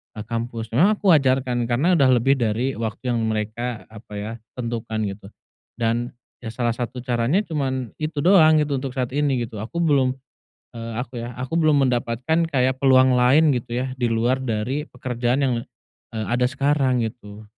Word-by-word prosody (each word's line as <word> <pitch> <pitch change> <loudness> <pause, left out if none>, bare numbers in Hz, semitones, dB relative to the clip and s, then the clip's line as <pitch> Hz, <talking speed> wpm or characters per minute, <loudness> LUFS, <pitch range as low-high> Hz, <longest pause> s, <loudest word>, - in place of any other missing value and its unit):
eee, 105 - -6
kampus. 115 0 -5
Memang 180 - +4
aku 200 -3 +2
wajarkan 130 -4 +2
karena 155 +8 +2
udah 135 - +5
lebih 135 +3 +2
dari 115 +3 0
waktu 115 +3 -3
yang 120 - 0
mereka, 110 +2 -3
apa 105 -1 -13
ya, 105 +2 -4 0.2
tentukan 115 -3 -3
gitu. 100 0 -6 0.5
Dan, 120 +1 -1 0.2
ya 115 - -8
salah 120 +1 -1
satu 120 +1 -5
caranya 125 - +1
cuman 130 - -3
itu 155 -2 -3
doang 165 -4 +6
gitu 140 -3 -2
untuk 130 -1 -6
saat 125 -2 -2
ini, 140 -4 0
gitu. 110 -2 -7
Aku 170 +11 -3
belum, 135 -5 +2 0.6
eee, 115 -1 -6
aku 125 -1 -5
ya, 120 - -5
aku 145 +7 -1
belum 145 -3 +4
mendapatkan 125 +7 0
kayak 130 -2 0
peluang 130 -1 +5
lain 135 +5 +4
gitu 120 -1 -4 0.2
ya, 130 - -5
di 125 -2 -1
luar 120 +4 +1
dari 130 +5 -2
pekerjaan 125 +1 -1
yang, 130 - +1 0.6
eee, 110 -1 -3
ada 125 +1 +2
sekarang, 135 -1 +1
gitu. 110 -2 -8
125 Hz, 175 wpm, -22 LUFS, 115-135 Hz, 0.6 s, doang